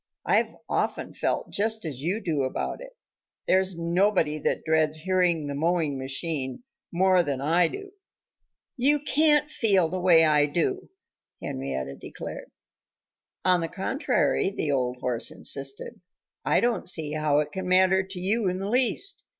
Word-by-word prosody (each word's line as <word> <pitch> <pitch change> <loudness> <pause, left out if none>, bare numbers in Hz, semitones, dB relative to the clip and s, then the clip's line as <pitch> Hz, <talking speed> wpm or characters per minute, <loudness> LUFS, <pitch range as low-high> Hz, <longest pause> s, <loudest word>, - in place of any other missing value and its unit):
"I've - - +1
often - - -2
felt - - -2
just 220 0 -1
as 140 -5 -5
you 185 +9 -2
do 160 -7 -1
about 130 - -3
it. - - -11 0.5
There's 190 0 +2
nobody 170 -2 +1
that - - -1
dreads 155 -1 +2
hearing 175 -2 +1
the 145 - -4
mowing 155 -2 0
machine 135 - -2 0.3
more 185 +1 +3
than 140 -5 -3
I 165 +5 +2
do." 400 - -8 0.9
"You 285 +4 +3
can't 295 0 +3
feel 195 - +1
the 185 - -3
way 170 -3 +5
I 150 -1 +3
do," 370 - -2 0.5
Henrietta 65 0 -5
declared. - - -8 1.0
"On 180 -1 +3
the 165 - -2
contrary," 195 - 0
the 155 -7 -2
old 125 -2 -1
horse 120 -1 +2
insisted, 475 +3 -2 0.4
"I - - +2
don't 240 -5 0
see 155 -4 +2
how 155 -1 +1
it 150 0 0
can 190 -1 -5
matter 185 +1 +4
to 190 -1 -8
you 200 +2 0
in 180 - -3
the 195 +2 -4
least. 255 - +1
180 Hz, 150 wpm, -26 LUFS, 150-200 Hz, 1.0 s, way